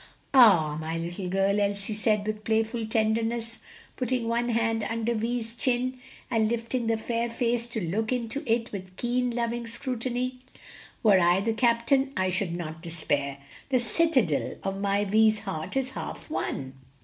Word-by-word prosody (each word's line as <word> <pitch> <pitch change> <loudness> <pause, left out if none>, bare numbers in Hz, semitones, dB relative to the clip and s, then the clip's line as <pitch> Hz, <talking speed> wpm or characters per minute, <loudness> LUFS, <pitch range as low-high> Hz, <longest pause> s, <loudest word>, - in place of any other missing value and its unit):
"Ah, 175 - +6
my 160 +1 -3
little 175 +3 -4
girl!" 195 +2 +2
Elsie 200 +1 0
said, 210 -1 +1
with 215 0 -3
playful 225 +1 0
tenderness, 225 +1 0 0.4
putting 250 -2 -1
one 235 +1 0
hand 230 -1 +1
under 225 +2 -1
Vi's 230 0 -2
chin, 255 +1 0 0.3
and 220 -2 +2
lifting 235 +1 -1
the 225 0 +2
fair 235 +1 -1
face 235 0 0
to 235 -1 -3
look 210 +5 -1
into 250 +2 -2
it 230 0 +1
with 185 -2 -8
keen, 245 +1 0
loving 235 0 -2
scrutiny, 250 +1 -2 0.6
"were 205 -4 +6
I 175 +1 +4
the 225 +3 0
captain, 240 +4 +2
I 185 0 +1
should 180 -2 -1
not 160 -2 -6
despair; 145 -5 -1 0.3
the 260 -2 +3
citadel 240 - +1
of 195 0 -3
my 200 0 +1
Vi's 215 +1 +4
heart 190 +2 -4
is 265 -1 -1
half - - -7
won." 130 -1 -3
225 Hz, 160 wpm, -27 LUFS, 195-240 Hz, 0.6 s, Ah